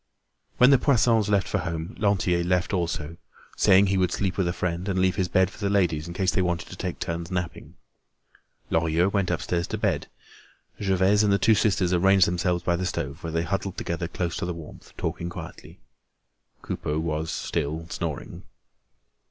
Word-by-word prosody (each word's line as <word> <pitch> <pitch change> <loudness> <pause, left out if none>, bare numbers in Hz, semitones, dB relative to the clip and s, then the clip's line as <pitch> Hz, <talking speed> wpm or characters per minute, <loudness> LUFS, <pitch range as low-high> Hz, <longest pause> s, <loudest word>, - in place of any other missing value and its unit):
When 125 +2 +7
the 135 - +6
Poissons 115 -6 +3
left 100 -2 +2
for 105 - -1
home, 85 +2 -4
Lantier 95 -4 +2
left 90 +1 0
also, 85 -3 -2 0.4
saying 95 +2 +5
he 95 -1 +1
would 90 -2 +2
sleep 95 -1 -1
with 95 -3 0
a - - +1
friend 90 +1 -3
and 95 - -1
leave 95 0 +2
his 95 -2 0
bed 95 +2 +2
for - - -15
the 100 -2 0
ladies 85 -6 +1
in 85 - -7
case 95 -1 +1
they - - +1
wanted 85 -2 -1
to - - -8
take 90 -1 -4
turns 85 -1 -4
napping. 90 -2 -5 1.0
Lorilleux 80 +3 +2
went 100 -3 0
upstairs 85 -1 -1
to - - -3
bed. - - -1 0.7
Gervaise 95 +1 +3
and 105 -1 +3
the 100 - +4
two 110 +3 +4
sisters 95 -4 +2
arranged 95 +1 +5
themselves 90 0 0
by 85 - +1
the 90 +1 -2
stove 70 -5 -4
where 85 - -4
they 80 +1 0
huddled 95 +2 -3
together 85 0 -3
close 85 0 -3
to - - -2
the 90 - -3
warmth, 80 -2 -11
talking 85 - -3
quietly. - - -9 0.9
Coupeau 75 +1 -3
was 80 0 -2
still 80 +3 -3
snoring. - - -5
90 Hz, 185 wpm, -25 LUFS, 85-95 Hz, 1.0 s, When